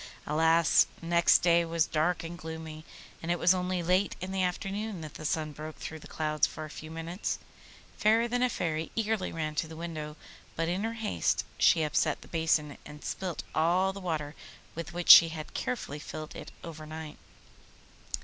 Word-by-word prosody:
Alas! 160 +2 +4
next 170 0 +4
day 170 -1 +5
was 165 -1 +1
dark 165 +3 0
and 165 +1 -6
gloomy, 160 -1 -7 0.4
and 165 - -5
it 175 - +1
was 175 +2 +5
only 180 -1 -1
late 185 +3 +2
in 185 +1 -5
the 190 0 0
afternoon 195 +2 -2
that 155 -2 -8
the - - -8
sun 155 0 -1
broke 155 +2 -8
through 160 - -7
the - - -12
clouds 155 -1 +1
for 155 - -7
a 155 - -10
few 155 - -9
minutes. 165 +4 -3 0.6
Fairer 225 +2 +4
than 245 +1 -1
a 250 - +3
Fairy 160 -6 -2
eagerly 220 -3 0
ran 155 -2 -3
to 155 +1 -1
the 160 - -9
window, 155 -2 -6 0.4
but 165 0 -1
in 180 +4 -1
her 225 +1 -1
haste 220 - 0
she 165 - +5
upset 150 - 0
the - - -15
basin, 160 -3 0
and 150 0 -11
spilt 185 -4 -3
all 180 +4 +2
the 200 - -7
water 155 -5 -2 0.4
with 165 0 -6
which 175 0 -4
she 165 - +11
had 155 -1 -7
carefully 150 - -3
filled 155 +1 -7
it - - -8
overnight. 155 -1 -8
165 Hz, 185 wpm, -30 LUFS, 155-180 Hz, 0.6 s, she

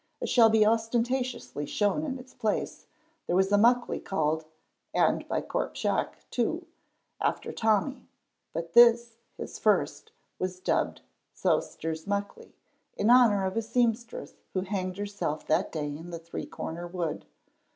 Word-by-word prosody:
As - - -3
shall 230 -3 +7
be 220 -1 +5
ostentatiously 235 - 0
shown 205 - +1
in 270 -4 -3
its 255 0 -13
place, 215 -1 -2 0.4
there 175 - +1
was 190 +1 +3
a - - +6
Muckley 240 +4 +3
called 160 -3 -1 0.5
(and - - +2
by - - -1
Corp - - -3
Shiach, - - 0 0.2
too) 325 +9 -1 0.6
after - - -1
Tommy, 220 +5 0 0.4
but 165 0 -5
this, 235 -1 +6 0.2
his - - -7
first, 445 - +1 0.3
was 185 0 -3
dubbed 185 - 0 0.3
Sewster's 160 +2 -1
Muckley, 200 0 -4 0.4
in 220 - +3
honor 225 -6 +6
of 190 - -2
a 225 - +1
seamstress 230 0 -1 0.2
who 185 - +2
hanged 185 -1 -3
herself 200 -7 -3
that - - +1
day 155 -2 -3
in 165 +3 -9
the 170 - -5
Three 165 +1 -7
cornered 175 +2 -6
Wood. 170 -4 -3
205 Hz, 145 wpm, -28 LUFS, 180-235 Hz, 0.6 s, shall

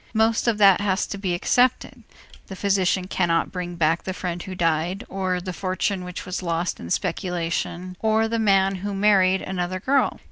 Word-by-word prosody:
Most 225 +2 +2
of 230 -3 +2
that 200 -2 +6
has 195 -1 0
to 200 - -6
be 185 -3 -1
accepted. 250 +7 +1 0.5
The 195 - -7
physician 190 -1 +1
cannot 175 -3 0
bring 180 -1 -5
back 165 0 +1
the 185 - -5
friend 175 -1 -4
who 185 +1 -7
died 170 +4 0
or 185 -2 -1
the 185 0 -6
fortune 185 +1 -2
which 180 0 -7
was 185 +1 -4
lost 170 0 -2
in 85 - -8
speculation 180 - -2
or 220 0 +2
the 230 0 -1
man 195 -2 +3
who 200 +2 -4
married 195 -2 +3
another 185 0 -3
girl. 270 +7 +1
185 Hz, 180 wpm, -23 LUFS, 180-200 Hz, 0.5 s, that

